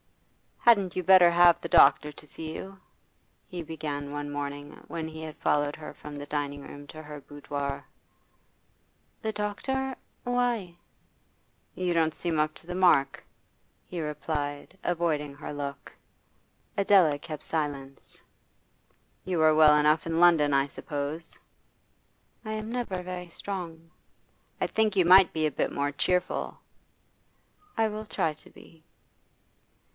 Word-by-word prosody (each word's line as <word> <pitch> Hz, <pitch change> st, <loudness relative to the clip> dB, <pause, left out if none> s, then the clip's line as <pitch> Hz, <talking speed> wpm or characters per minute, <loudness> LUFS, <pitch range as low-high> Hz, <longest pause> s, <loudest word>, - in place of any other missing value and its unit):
'Hadn't 200 Hz, -6 st, +4 dB
you 185 Hz, -, -1 dB
better 185 Hz, -1 st, +8 dB
have 175 Hz, 0 st, +6 dB
the -, -, -4 dB
doctor 150 Hz, +1 st, +6 dB
to 150 Hz, -, -13 dB
see 160 Hz, +1 st, -7 dB
you?' 195 Hz, 0 st, -8 dB, 0.7 s
he 180 Hz, -1 st, -6 dB
began 150 Hz, -3 st, -5 dB
one 145 Hz, 0 st, -4 dB
morning 145 Hz, 0 st, -5 dB, 0.2 s
when 160 Hz, -1 st, -4 dB
he 160 Hz, 0 st, -8 dB
had 155 Hz, -1 st, -7 dB
followed 145 Hz, 0 st, +1 dB
her 155 Hz, -1 st, -9 dB
from 150 Hz, -1 st, -9 dB
the 145 Hz, -, -6 dB
dining 145 Hz, -1 st, -3 dB
room 145 Hz, +1 st, -10 dB
to 155 Hz, +1 st, -10 dB
her 150 Hz, -1 st, -8 dB
boudoir. 140 Hz, -1 st, -5 dB, 1.4 s
'The 220 Hz, -, -1 dB
doctor? 260 Hz, +6 st, -2 dB, 0.3 s
Why?' 240 Hz, -8 st, -1 dB, 1.0 s
'You 180 Hz, -1 st, 0 dB
don't 160 Hz, -2 st, +2 dB
seem 165 Hz, -3 st, -1 dB
up 155 Hz, 0 st, +1 dB
to -, -, -16 dB
the 180 Hz, -, -4 dB
mark,' 175 Hz, -7 st, +3 dB, 0.6 s
he 175 Hz, -2 st, -5 dB
replied, 150 Hz, +1 st, -4 dB
avoiding 155 Hz, -5 st, -1 dB
her 150 Hz, -, -7 dB
look. 140 Hz, -1 st, -6 dB, 0.9 s
Adela 190 Hz, -7 st, +4 dB
kept 155 Hz, -1 st, -7 dB
silence. 140 Hz, -4 st, -4 dB, 1.0 s
'You 180 Hz, -3 st, -1 dB
were 155 Hz, 0 st, +5 dB
well 155 Hz, -1 st, +7 dB
enough 150 Hz, +2 st, +3 dB
in 165 Hz, 0 st, 0 dB
London, 165 Hz, -4 st, +5 dB
I 135 Hz, 0 st, +4 dB
suppose?' 145 Hz, +3 st, -5 dB, 1.1 s
'I 215 Hz, -, -3 dB
am 215 Hz, +1 st, -4 dB
never 230 Hz, -7 st, -3 dB
very 180 Hz, -1 st, -6 dB
strong.' 165 Hz, -3 st, -7 dB, 0.7 s
'I -, -, +2 dB
think 220 Hz, -2 st, +1 dB
you 185 Hz, -3 st, +4 dB
might 185 Hz, 0 st, +7 dB
be 155 Hz, -1 st, +1 dB
a 155 Hz, -, +1 dB
bit -, -, -1 dB
more 140 Hz, 0 st, -1 dB
cheerful.' 180 Hz, +5 st, -1 dB, 1.2 s
'I 225 Hz, 0 st, +3 dB
will 215 Hz, +1 st, -6 dB
try 160 Hz, -6 st, -1 dB
to 150 Hz, -, -19 dB
be. 160 Hz, -1 st, -18 dB
160 Hz, 140 wpm, -28 LUFS, 145-180 Hz, 1.4 s, better